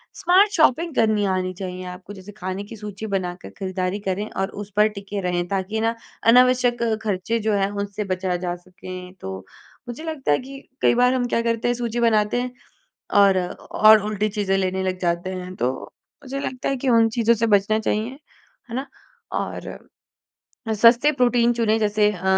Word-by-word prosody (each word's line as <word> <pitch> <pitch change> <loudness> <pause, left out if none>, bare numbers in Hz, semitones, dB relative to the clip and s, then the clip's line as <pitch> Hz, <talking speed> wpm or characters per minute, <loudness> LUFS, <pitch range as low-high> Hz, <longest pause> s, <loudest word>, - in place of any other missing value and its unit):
Smart 385 +4 +4
shopping 325 -1 +2
करनी 215 -2 +2
आनी 185 -1 -1
चाहिए 185 0 -6
आपको 180 +2 -11
जैसे 195 +1 -11
खाने 190 -1 -5
की 205 - -10
सूची 210 0 -7
बनाकर 180 -2 -3
खरीदारी 185 0 -2
करें 200 +1 -3
और 195 0 -2
उस 205 0 -9
पर 210 +1 +5
टिके 200 -1 -6
रहें, 175 -1 -1
ताकि 195 +3 -2
ना 230 +1 +1 0.3
अनावश्यक 245 0 +5 0.2
खर्चे 210 +2 -1
जो 220 0 0
हैं, 195 -1 +1
उनसे 205 +1 -3
बचा 185 0 -2
जा 175 0 -3
सकें। 185 0 -10
तो, 95 0 -6 0.4
मुझे 245 +6 -7
लगता 310 - -2
है 145 - +3
कि 270 +2 -9 0.2
कई - - +4
बार 250 +1 +4
हम 255 -1 0
क्या 230 - +1
करते 230 0 0
हैं 245 - +1
सूची 240 -1 -3
बनाते 225 0 +2
हैं 250 0 -4 0.7
और 195 -2 +6 0.3
और 215 0 +7
उल्टी 210 0 -1
चीज़ें 200 -2 0
लेने 190 0 -1
लग 185 -1 -2
जाते 175 +1 -1
हैं, 185 0 -6
तो 125 +1 0 0.5
मुझे 275 +1 -4
लगता 255 -2 -3
है 275 - 0
कि 265 +1 -3
उन 230 -2 +5
चीज़ों 235 0 +3
से 230 +1 0
बचना 210 0 +3
चाहिए, 220 +4 -2 0.5
है - - -5
ना? 265 +2 -3 0.5
और - - -4 1.0
अ, - - +1
सस्ते 235 +7 +5
प्रोटीन 245 -3 +3
चुने 225 -2 +1
जैसे 210 -1 +2
अ, 185 -2 -9
210 Hz, 185 wpm, -22 LUFS, 190-235 Hz, 1.0 s, और